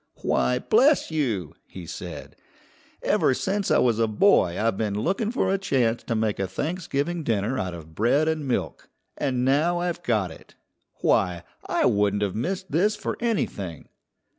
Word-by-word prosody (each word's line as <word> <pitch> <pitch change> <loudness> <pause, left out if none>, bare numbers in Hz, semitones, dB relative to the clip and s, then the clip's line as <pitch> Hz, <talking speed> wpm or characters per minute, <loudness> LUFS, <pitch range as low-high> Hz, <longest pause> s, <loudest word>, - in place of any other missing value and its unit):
"Why, 125 - +2
bless 255 - +3
you!" 115 - -1
he 90 -2 -9
said, - - -8 0.7
"ever 130 - +2
since 195 +5 -1
I - - +4
was 115 -3 +2
a 115 - +3
boy 105 - +3
I've 115 -1 +1
been 105 -1 -1
looking 195 - 0
for 230 -5 0
a 195 - 0
chance 125 -10 +1
to 115 - -3
make 110 -2 0
a 95 - 0
Thanksgiving 160 - -2
dinner 115 +1 0
out 90 -2 -3
of 80 -1 -11
bread 120 - +2
and 155 -3 -1
milk. 125 - -3 0.3
And 130 -3 -1
now 155 +6 +2
I've 175 0 -2
got 110 - 0
it. - - -15 0.5
Why, 90 -1 +2 0.2
I - - +1
wouldn't 100 0 +2
have 100 -3 -1
missed 185 - -3
this 200 +8 +2
for 210 - -4
anything!" 100 - -2
125 Hz, 165 wpm, -25 LUFS, -, 0.7 s, I